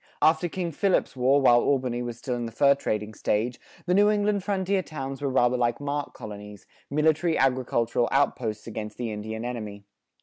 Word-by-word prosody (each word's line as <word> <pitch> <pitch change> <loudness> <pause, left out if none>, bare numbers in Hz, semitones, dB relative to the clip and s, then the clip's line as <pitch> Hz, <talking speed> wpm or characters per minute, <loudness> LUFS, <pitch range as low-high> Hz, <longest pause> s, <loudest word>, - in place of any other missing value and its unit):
After 160 +2 +3
King 175 0 -3
Philip's 190 0 +1
War, 130 +2 +3
while 120 -2 +6
Albany 130 -3 0
was 120 -1 -5
still 125 +1 -4
in 120 -1 -3
the - - -8
fur 140 +5 +4
trading 110 -6 -3
stage, 110 +4 -1 0.3
the 180 - +1
New 205 +2 +5
England 205 -1 +1
frontier 195 -1 0
towns 135 -5 -6
were 140 - 0
rather 125 -1 +2
like 120 -1 0
mark 145 0 -3
colonies, 105 -1 -9 0.2
military 155 +3 +2
agricultural 125 -3 +1
outposts 115 -6 0
against 105 -2 -6
the 120 -2 -3
Indian 110 +2 -5
enemy. 105 -4 -6
130 Hz, 175 wpm, -26 LUFS, 115-155 Hz, 0.3 s, while